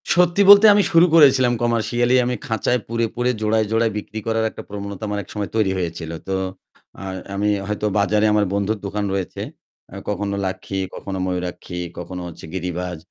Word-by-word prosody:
সত্যি 175 Hz, +2 st, +3 dB
বলতে, 205 Hz, +1 st, +10 dB
আমি 205 Hz, 0 st, +4 dB
শুরু 165 Hz, +1 st, +6 dB
করেছিলাম 130 Hz, -5 st, +6 dB
কমার্শিয়ালি, 120 Hz, +1 st, +1 dB
আমি 125 Hz, 0 st, -1 dB
খাঁচায় 115 Hz, +3 st, 0 dB
পুরে, 115 Hz, 0 st, 0 dB
পুরে 125 Hz, +1 st, +1 dB
জোড়ায় 110 Hz, 0 st, +2 dB
জোড়ায় 115 Hz, 0 st, +2 dB
বিক্রি 105 Hz, +1 st, -6 dB
করার 110 Hz, 0 st, +1 dB
একটা -, -, -10 dB
প্রবণতা 100 Hz, 0 st, -6 dB
আমার 105 Hz, 0 st, -2 dB
একসময় 105 Hz, +1 st, -5 dB
তৈরি 105 Hz, -4 st, +2 dB
হয়েছিল। 85 Hz, -2 st, -4 dB, 0.2 s
তো 95 Hz, -, -1 dB, 0.7 s
আ -, -, -7 dB, 0.3 s
আমি 105 Hz, +1 st, +1 dB, 0.2 s
হয়তো 105 Hz, 0 st, -2 dB
বাজারে, 105 Hz, +1 st, +2 dB
আমার 105 Hz, -1 st, +3 dB
বন্ধুর 100 Hz, +2 st, 0 dB
দোকান 105 Hz, +1 st, -2 dB
রয়েছে, 95 Hz, -2 st, -3 dB, 0.7 s
কখনো 105 Hz, -1 st, -2 dB
লাক্ষী, 95 Hz, +1 st, -4 dB, 0.2 s
কখনো 95 Hz, -1 st, -5 dB
ময়ূরপঙ্খী, 90 Hz, -1 st, -4 dB, 0.2 s
কখনো 90 Hz, +1 st, -6 dB
হচ্ছে 85 Hz, -, -10 dB
গিরিবাজ। 90 Hz, -1 st, -4 dB
105 Hz, 165 wpm, -21 LUFS, 95-115 Hz, 0.7 s, বলতে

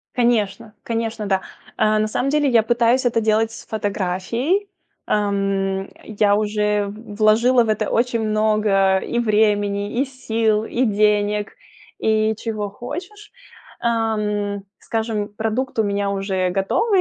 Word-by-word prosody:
Конечно, 215 Hz, -4 st, 0 dB
конечно, 225 Hz, -2 st, -3 dB
да. 190 Hz, -1 st, +1 dB, 0.4 s
А, 215 Hz, 0 st, +3 dB
на 215 Hz, -, +1 dB
самом 250 Hz, +5 st, -1 dB
деле 295 Hz, -1 st, +2 dB
я 230 Hz, -3 st, +5 dB
пытаюсь 240 Hz, +2 st, +2 dB
это 230 Hz, -1 st, +2 dB
делать 220 Hz, 0 st, +2 dB
с -, -, -11 dB
фотографией. 220 Hz, -, -1 dB, 0.4 s
Ам, 195 Hz, -2 st, 0 dB
э, -, -, -15 dB, 0.2 s
я 205 Hz, -1 st, +2 dB
уже 210 Hz, -1 st, 0 dB
в 210 Hz, +1 st, -9 dB
вложила 230 Hz, +3 st, +4 dB
в 225 Hz, -, -4 dB
это 215 Hz, -, 0 dB
очень 235 Hz, 0 st, +1 dB
много 215 Hz, -3 st, +2 dB
и 235 Hz, -, -3 dB
времени, 210 Hz, -1 st, +1 dB
и -, -, +3 dB
сил, 225 Hz, -5 st, 0 dB
и 245 Hz, +3 st, 0 dB
денег, 210 Hz, -1 st, +1 dB, 0.4 s
и 220 Hz, 0 st, +2 dB
чего 215 Hz, -2 st, -3 dB
хочешь. 360 Hz, -, -8 dB, 0.5 s
Ам, 210 Hz, -3 st, -1 dB, 0.2 s
скажем, 220 Hz, -2 st, -2 dB
продукт 225 Hz, +4 st, -3 dB
у -, -, +5 dB
меня 200 Hz, -1 st, -1 dB
уже 195 Hz, -2 st, -1 dB
готовый, 370 Hz, -, +1 dB
215 Hz, 140 wpm, -21 LUFS, 205-230 Hz, 0.5 s, я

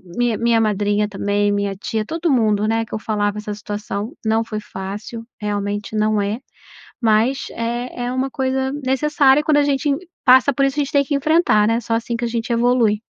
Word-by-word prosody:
minha 240 Hz, -2 st, +1 dB
minha 230 Hz, -1 st, +2 dB
madrinha 210 Hz, 0 st, +1 dB
também, 205 Hz, +1 st, 0 dB
minha 200 Hz, -1 st, -1 dB
tia 215 Hz, +2 st, -3 dB
todo 330 Hz, +4 st, -1 dB
mundo, 215 Hz, -5 st, +2 dB
né, 225 Hz, 0 st, 0 dB
que -, -, -14 dB
eu 215 Hz, -, -2 dB
falava 210 Hz, -1 st, -1 dB
essa 210 Hz, 0 st, -5 dB
situação. 205 Hz, +2 st, -5 dB
Não 220 Hz, +1 st, +2 dB
foi 215 Hz, -2 st, -4 dB
fácil, 210 Hz, +5 st, -7 dB, 0.2 s
realmente 205 Hz, 0 st, -3 dB
não 215 Hz, -1 st, +2 dB
é, 205 Hz, +3 st, -2 dB, 0.6 s
mas 230 Hz, +3 st, +2 dB
é 240 Hz, +1 st, -4 dB
é 245 Hz, -, -2 dB
uma 260 Hz, +1 st, -1 dB
coisa 265 Hz, 0 st, -1 dB
necessária 280 Hz, +1 st, +3 dB
quando 300 Hz, -1 st, +3 dB
a 290 Hz, -, +4 dB
gente 285 Hz, 0 st, 0 dB, 0.4 s
passa 260 Hz, +2 st, +6 dB
por 275 Hz, +2 st, +2 dB
isso 275 Hz, +1 st, -1 dB
a 290 Hz, -, +3 dB
gente 275 Hz, -, -6 dB
tem 285 Hz, -1 st, +3 dB
que 285 Hz, +1 st, -2 dB
enfrentar 280 Hz, -7 st, +3 dB
né 230 Hz, +1 st, +2 dB
só 230 Hz, 0 st, -3 dB
assim 235 Hz, +1 st, -2 dB
que 240 Hz, -, -2 dB
a -, -, 0 dB
gente 230 Hz, 0 st, -3 dB
evolui. 235 Hz, -3 st, +2 dB
230 Hz, 200 wpm, -20 LUFS, 210-260 Hz, 0.6 s, passa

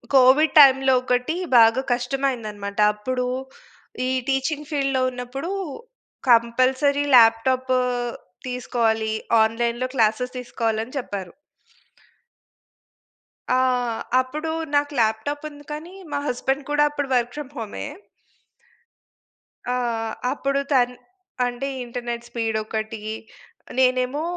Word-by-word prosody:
Covid 270 Hz, +4 st, +5 dB
టైమ్‌లో 270 Hz, -1 st, +6 dB
ఒకటి 250 Hz, +6 st, 0 dB, 0.2 s
బాగా 230 Hz, +3 st, +5 dB
కష్టమైందన్నమాట. 240 Hz, -6 st, -3 dB
అప్పుడు 250 Hz, +4 st, -3 dB, 0.8 s
ఈ -, -, 0 dB, 0.2 s
టీచింగ్ 290 Hz, +3 st, -1 dB
ఫీల్డ్‌లో 275 Hz, -2 st, 0 dB
ఉన్నప్పుడు 250 Hz, +6 st, -6 dB, 0.8 s
కంపల్సరీ 255 Hz, +5 st, +3 dB
ల్యాప్‌టాప్ 250 Hz, +3 st, +4 dB, 0.8 s
తీసుకోవాలి. 225 Hz, -3 st, 0 dB, 0.3 s
ఆన్‌లైన్‌లో 235 Hz, +2 st, -1 dB
క్లాసెస్ 235 Hz, +2 st, +1 dB
తీసుకోవాలని 225 Hz, -1 st, -2 dB
చెప్పారు. 195 Hz, -7 st, -6 dB, 2.2 s
ఆ! -, -, +3 dB, 0.6 s
అప్పుడు 305 Hz, +5 st, -4 dB, 0.2 s
నాకు 290 Hz, 0 st, +2 dB
ల్యాప్‌టాప్ 225 Hz, +8 st, -1 dB
ఉంది 290 Hz, -1 st, -14 dB
కాని 320 Hz, +5 st, -7 dB, 0.2 s
మా 285 Hz, -, 0 dB
హస్బెండ్ 270 Hz, +2 st, -1 dB
కూడా 295 Hz, 0 st, +4 dB
అప్పుడు 290 Hz, -2 st, -4 dB
వర్క్ 240 Hz, 0 st, 0 dB
ఫ్రమ్ 290 Hz, -2 st, -7 dB
హోమే. 220 Hz, +2 st, -5 dB, 1.9 s
ఆహ్, 230 Hz, -3 st, -2 dB, 0.2 s
అప్పుడు 275 Hz, 0 st, -1 dB
తన్ 250 Hz, -2 st, +3 dB, 0.5 s
అంటే 245 Hz, +2 st, -3 dB, 0.2 s
ఇంటర్నెట్ 240 Hz, -1 st, -5 dB
స్పీడ్ 225 Hz, -2 st, -2 dB
ఒకటి, 220 Hz, 0 st, -4 dB, 0.8 s
నేనేమో 255 Hz, +2 st, +2 dB
250 Hz, 95 wpm, -23 LUFS, 230-275 Hz, 2.2 s, టైమ్‌లో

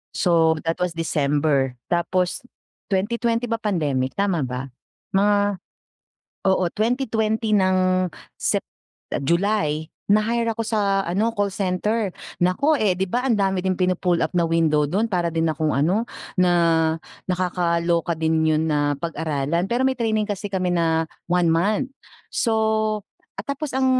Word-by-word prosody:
So, 165 Hz, -3 st, +3 dB
that 165 Hz, 0 st, -2 dB
was 180 Hz, -2 st, -1 dB
December. 145 Hz, -4 st, +1 dB, 0.2 s
Tapos, 180 Hz, +3 st, 0 dB, 0.5 s
2020 230 Hz, +4 st, 0 dB
ba 230 Hz, 0 st, -1 dB
pandemic? 150 Hz, -11 st, -1 dB
Tama 200 Hz, -4 st, +1 dB
ba? 130 Hz, +1 st, -5 dB, 0.4 s
Mga 205 Hz, +1 st, +4 dB, 1.1 s
oo, 190 Hz, -1 st, +2 dB
2020 220 Hz, -1 st, 0 dB
ng 185 Hz, -2 st, +2 dB, 0.3 s
Sep -, -, 0 dB, 0.6 s
July, 170 Hz, -1 st, 0 dB, 0.2 s
na-hire 230 Hz, +2 st, +2 dB
ako 230 Hz, -, -2 dB
sa 200 Hz, -3 st, +1 dB
ano, 210 Hz, +7 st, 0 dB
call 205 Hz, -1 st, +1 dB
center. 200 Hz, +3 st, -1 dB, 0.3 s
Naku, 230 Hz, -, +2 dB
eh 205 Hz, -4 st, +3 dB
'di 190 Hz, +2 st, -1 dB
ba, 250 Hz, +2 st, 0 dB
ang 235 Hz, -, +3 dB
dami 195 Hz, -2 st, +1 dB
din 190 Hz, -, +2 dB
pinu-pull 180 Hz, -1 st, +1 dB
up -, -, -2 dB
na 170 Hz, -, +3 dB
window 160 Hz, -2 st, +2 dB
do'n? 205 Hz, +9 st, 0 dB
Para 175 Hz, -2 st, +1 dB
din 165 Hz, 0 st, +1 dB
akong 155 Hz, 0 st, -1 dB
ano, 180 Hz, -, +2 dB, 0.3 s
na 180 Hz, -1 st, +4 dB, 0.8 s
nakakaloka 175 Hz, -2 st, 0 dB
din 160 Hz, 0 st, +1 dB
'yon 155 Hz, 0 st, +2 dB
na 145 Hz, -1 st, +1 dB
pag-aralan. 160 Hz, 0 st, -1 dB
Pero 240 Hz, +4 st, 0 dB
may 265 Hz, -1 st, +1 dB
training 220 Hz, -2 st, +1 dB
kasi 205 Hz, 0 st, -3 dB
kami 185 Hz, -2 st, -1 dB
na 165 Hz, -1 st, +2 dB, 0.2 s
1 175 Hz, -1 st, +2 dB
month. 205 Hz, +10 st, +1 dB, 0.4 s
So, 220 Hz, -2 st, +1 dB, 0.3 s
at 200 Hz, -, -5 dB
tapos 280 Hz, 0 st, -3 dB
ang 265 Hz, 0 st, +2 dB
185 Hz, 140 wpm, -23 LUFS, 165-215 Hz, 1.1 s, Mga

